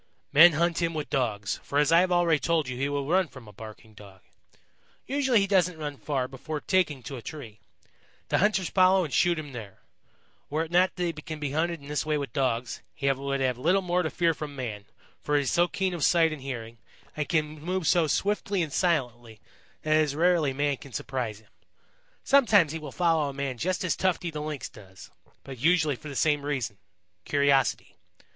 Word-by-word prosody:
"Men 165 +3 +8
hunt 170 +2 +1
him 165 -1 -1
with 150 -1 -4
Dogs, 110 -8 -1
for 140 - -3
as 150 +1 +3
I 165 - +7
have 185 0 +1
already 170 -3 +3
told 165 -3 0
you 130 - -4
he 135 +3 -1
will 145 -1 -2
run 185 +3 +2
from 130 -6 -14
a 105 - -13
barking 110 +1 -12
Dog. 100 -2 -15 0.8
Usually 265 -4 +2
he - - +2
doesn't 180 -3 +2
run 145 -2 -5
far 135 -3 -2
before 150 +4 -6
taking 155 -7 0
to 135 +3 -7
a - - -8
tree. 115 -7 -9 0.7
The - - +2
hunters 200 -2 +1
follow 185 0 +4
and 145 - -7
shoot 175 +6 +3
him 150 -2 -6
there. 110 -6 -9 0.7
Were 155 +2 0
it 165 - -9
not 180 +2 +3
that 180 - -3
he 170 -1 -1
can 155 0 -8
be 145 -2 -3
hunted 165 +2 -1
in 140 - -12
this 150 0 -1
way 155 -1 0
with 140 -1 -5
Dogs, 125 -4 -1
he 140 0 +1
would 140 0 -2
have 125 -2 0
little 180 +3 +1
to 160 - -2
fear 170 0 +1
from 150 -2 -7
man, 110 -6 -5 0.4
for 150 - -1
he 145 - +3
is 135 - -1
so 175 +1 +3
keen 190 +1 -2
of 170 -4 -3
sight 165 -1 +4
and 150 - -8
hearing 115 -4 -7 0.4
and 150 -1 -3
can 155 -2 -1
move 180 +2 -2
so 170 0 +3
swiftly 200 +3 0
and 150 -4 -6
silently, 120 - -1 0.4
that 155 0 +3
it - - +4
is 145 -2 -1
rarely 165 -3 +2
man 145 +1 0
can 140 -1 -13
surprise 120 -5 -4
him. 110 - -28 0.7
Sometimes 215 - +4
he 160 - -4
will 150 -3 -8
follow 165 -4 +1
a - - -7
man 135 -3 -4
just 185 +6 -1
as 185 - 0
Tufty 180 -2 -1
the 150 -1 -5
Lynx 150 -2 -5
does, 95 -3 -15 0.3
but 135 -3 -9
usually 155 0 +3
for 150 +4 -10
the 140 - -7
same 150 +1 +2
reason 130 -8 -3 0.4
curiosity. 140 0 +1
150 Hz, 210 wpm, -27 LUFS, 135-170 Hz, 0.8 s, Men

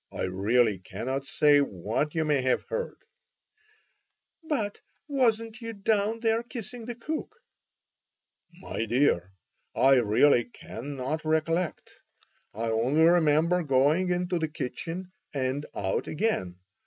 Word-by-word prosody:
I - - -4
really 100 +3 +2
cannot 130 +8 -4
say 145 0 +4
what 115 - -1
you 160 -1 +1
may 145 -3 +2
have 130 0 +1
heard." 485 0 -3 1.5
"But 245 -11 -2 0.3
wasn't 230 -4 0
you 230 0 -5
down 215 +2 0
there 225 0 +2
kissing 240 -1 -8
the 240 - -4
cook?" 310 - -5 1.2
"My 170 -10 -5
dear, 115 -7 +2 0.4
I 135 0 +5
really 120 +2 +4
cannot 135 +5 -5
recollect. 160 +2 0 0.6
I 115 +2 -2
only 125 +8 +2
remember 170 +1 +4
going 150 +5 +2
into 180 0 0
the 160 - 0
kitchen 165 +6 -5 0.2
and 135 +2 -1
out 95 -1 -1
again. 150 - -1
155 Hz, 115 wpm, -28 LUFS, 130-205 Hz, 1.5 s, I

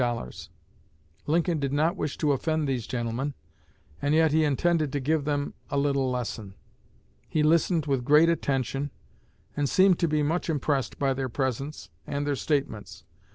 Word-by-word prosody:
Lincoln 165 +1 +1
did 140 -1 -1
not 155 +5 +2
wish 150 -6 -3
to 150 - +2
offend 155 +2 0
these 125 -5 -2
gentlemen, 125 +3 -2 0.7
and 145 +1 +2
yet 160 -1 +4
he 160 +1 +3
intended 155 +1 +1
to 145 - 0
give 145 +2 0
them 145 -1 -1 0.2
a 140 - -1
little 140 -2 +1
lesson. 110 -5 -4 0.7
He 155 - +1
listened 165 0 +3
with 135 -4 0
great 150 +5 +6
attention, 140 -3 0 0.7
and 145 -2 0
seemed 190 -2 +4
to 170 - +2
be 150 -1 +1
much 165 +4 -1
impressed 145 -3 -1
by 135 -1 +1
their 130 0 -3
presence 135 - -3 0.2
and 145 0 -2
their 145 -1 0
statements. 135 -7 -2
145 Hz, 155 wpm, -27 LUFS, 135-155 Hz, 0.7 s, great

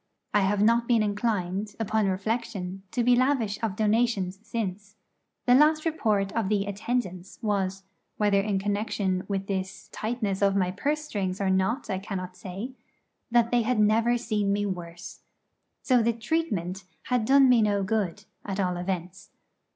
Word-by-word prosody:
I 210 - +5
have 200 +1 +2
not 235 +2 +3
been 230 -3 +3
inclined, 205 -1 -1
upon 220 -1 +1
reflection, 195 -1 -2
to 240 - 0
be 245 +1 +5
lavish 245 -5 +1
of 220 -4 -1
donations 210 -3 +1
since. 210 -2 -4 0.5
The 245 - +5
last 305 +4 +5
report 215 -11 +1
of 220 -4 -1
the 205 -2 +1
'attendants' 200 -3 -3
was 195 -2 -1 0.3
whether 205 -2 +3
in 200 -1 0
connexion 200 -2 -1
with 195 -1 -2
this 190 0 -4
tightness 215 -4 -2
of 195 -1 +3
my 185 -2 +1
purse 290 +10 -1
strings 190 -8 -3
or 195 -1 +1
not 190 +8 +1
I 190 -3 -2
cannot 185 -2 -5
say 190 +7 -6 0.6
that 235 -1 +3
they 245 -1 +4
had 235 0 0
never 225 +3 +3
seen 215 -4 0
me 205 +1 +1
worse. 175 -2 -6 0.6
So 250 -3 +4
the 230 +1 +2
'treatment' 215 - -2 0.2
had 250 -3 0
done 270 +3 +6
me 245 -3 +5
no 205 -2 +2
good, 205 -1 -1 0.2
at 195 -1 -4
all 180 -2 0
events. 180 0 -4
205 Hz, 160 wpm, -27 LUFS, 190-230 Hz, 0.6 s, done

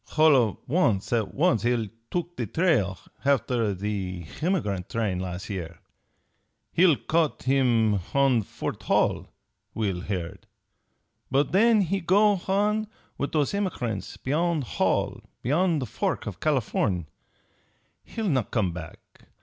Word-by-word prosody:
H'all 155 -1 +6
of 115 -5 +2
an' 135 - +3 0.2
at 105 -5 -1
once 140 - +3
he'll 120 -2 +1 0.2
took 175 0 -3
the 120 - -3
trail 115 - +1 0.3
h'after 120 -6 +1
the 95 -3 -3 0.2
h'emigrant 105 - -1
train 105 -6 -1
las' 90 +1 -5
year. 85 -5 -5 1.0
He'll 170 -3 +5
caught 160 +2 0
him 120 -6 +3
h'on 135 -4 +3
Fort - - -5
Hall; - - +1 0.5
we'll 100 -5 -1
heard. 90 -3 -5 0.8
But 135 +1 +1
then 220 +3 +5
he 195 +1 0
go 205 +4 +4
h'on 210 +4 0 0.3
with 140 - -1
those 150 -3 +2
h'emigrant 130 - -3
beyon' 160 +2 +1
Hall, 120 - 0 0.2
beyon' 165 +6 +2
the 135 - -2
fork 185 +2 -2
for 105 - -4
Californ'. 105 - 0 1.0
He'll 225 -2 -4
not 130 - +1
come 105 -7 0
back. 85 -2 -11
130 Hz, 130 wpm, -26 LUFS, 100-170 Hz, 1.0 s, H'all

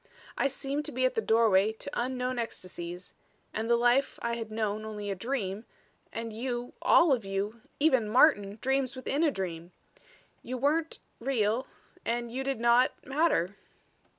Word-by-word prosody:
"I - - +2
seemed 275 +2 -3
to - - -5
be 255 +1 +1
at 255 - +2
the 450 - 0
doorway 220 - +4
to 220 - -7
unknown 250 0 -1
ecstasies 180 -5 -6 0.4
and 220 +2 -2
the 235 - +6
life 245 +3 +3
I 235 - 0
had 225 -2 -5
known 215 -1 -2
only 210 -2 -5
a - - -2
dream 210 -2 -3 0.5
and 230 -1 -5
you, 245 +1 -3
all 335 -4 +6
of 240 -4 0
you 200 +3 -3 0.2
even 260 -8 +3
Martin, 210 -5 +4
dreams 265 0 +1
within 275 +4 -1
a 320 - +5
dream. 175 - -5 0.7
You 255 +2 -5
weren't 305 +5 +1 0.2
real 230 -1 0 0.4
and 235 0 -2
you 260 +3 -3
did 270 -3 -2
not 235 +2 +4
matter." 270 - +1
235 Hz, 160 wpm, -29 LUFS, 210-265 Hz, 0.7 s, the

